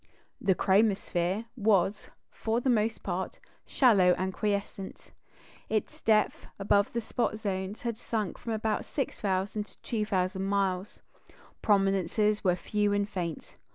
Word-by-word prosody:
The 190 - +3
"chromosphere" 195 0 +2
was, 205 -3 +2 0.2
for 225 +1 -1
the 255 +1 +1
most 220 -1 0
part, 185 0 -3 0.3
shallow 195 -9 +5
and 190 0 -2
quiescent; 200 -1 -3 0.6
its 215 -2 -2
depth, 215 -1 +2
above 200 0 +2
the 235 - -1
spot 220 -1 -1
zones, 195 -1 -3
had 235 -2 -3
sunk 215 -8 -3
from 230 - -4
about 220 0 -1
6,000 205 -6 -2
to - - -19
2,000 195 -4 -1
miles; 195 -1 -1 0.6
prominences 200 +1 +2
were 180 -3 +3
few 205 +2 0
and 205 0 +1
faint. 175 -6 -5
205 Hz, 125 wpm, -29 LUFS, 190-215 Hz, 0.6 s, shallow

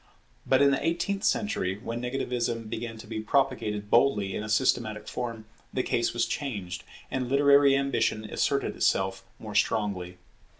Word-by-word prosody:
But 130 +1 +4
in 140 - +5
the 135 - 0
eighteenth 175 +5 -1
century, 95 - 0
when 115 +2 -5
negativism 120 -2 -2
began 115 +1 -5
to 110 - -10
be 110 0 -5
propagated 110 -4 0
boldly 105 -7 +3
in - - -2
a 110 - -6
systematic 110 -2 +1
form, 115 -3 -5 0.3
the 130 - -1
case 115 0 0
was 120 - +1
changed, 105 -11 -4 0.3
and 130 -2 -2
literary 140 0 +5
ambition 125 -5 0
asserted - - 0
itself 95 0 +1
more 110 -2 -8
strongly. 100 -4 0
115 Hz, 155 wpm, -28 LUFS, 105-135 Hz, 0.3 s, in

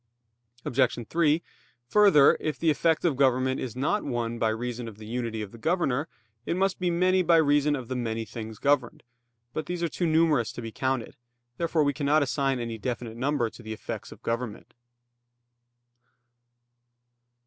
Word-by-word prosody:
Obj. 125 -2 +1
3: 165 -1 +2 0.5
Further, 195 -8 +6
if 155 -2 -2
the 165 -1 +2
effect 160 +3 +1
of 160 -5 +2
government 130 -1 +2
is 125 -3 -5
not 145 +11 0
one 120 -3 -2
by 110 - +2
reason 120 +1 -3
of 110 -2 -9
the 110 - -10
unity 115 -1 -3
of 100 - -9
the 115 - -13
Governor, 155 -1 0 0.4
it 170 - -2
must 195 0 +1
be 180 -1 +1
many 185 +2 +3
by 170 -1 +4
reason 145 -1 +3
of 130 -4 -6
the 130 - -3
many 115 -2 -2
things 110 0 -7
governed. 140 -2 +1 0.5
But 155 - -4
these 175 -1 -3
are - - +2
too 175 - -1
numerous 155 -7 +3
to - - -7
be 115 - -6
counted. 130 0 -2 0.4
Therefore 165 -2 +1
we 145 0 +1
cannot 145 +3 +2
assign 135 -1 0
any 115 -1 -4
definite 120 -1 -4
number 130 -2 0
to - - -13
the 110 -1 -6
effects 110 - -7
of - - -13
government. 115 -2 -4
130 Hz, 170 wpm, -27 LUFS, 115-155 Hz, 0.5 s, Further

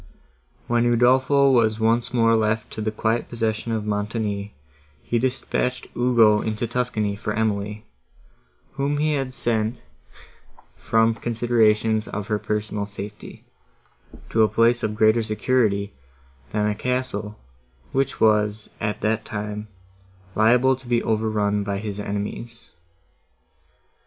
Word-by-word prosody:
When 120 0 +1
Udolpho 130 +3 +4
was 110 -3 +3
once 115 +2 +1
more 115 -2 +3
left 110 0 0
to 110 - -5
the 110 - 0
quiet 110 +2 -1
possession 115 -1 -2
of 110 -2 -2
Montoni, 105 -1 -2 0.5
he 120 - 0
dispatched 130 0 -1
Ugo 115 -4 +4
into 110 +1 -2
Tuscany 115 -4 -1
for 105 0 -4
Emily, 105 -1 -2 0.9
whom 140 +1 -1
he 155 +1 +1
had 135 -3 -2
sent 115 -1 -1 1.0
from 115 0 +2
considerations 110 -2 +1
of 105 +1 -5
her 105 -1 0
personal 105 -1 -3
safety, 100 0 -9 0.9
to 110 - +3
a 110 - +6
place 115 +1 +3
of 105 - -2
greater 110 +1 +4
security, 110 -2 0 0.6
than 105 -1 0
a 105 - +1
castle, 110 -2 -3 0.5
which 135 0 -1
was, 105 -1 +2
at 105 0 -2
that 110 +1 0
time, 105 -1 -5 0.7
liable 125 +5 +4
to 130 -1 -16
be 120 -1 +1
overrun 105 -2 0
by 100 0 -2
his 105 0 -5
enemies. 105 +3 -5
110 Hz, 125 wpm, -23 LUFS, 105-120 Hz, 1.0 s, a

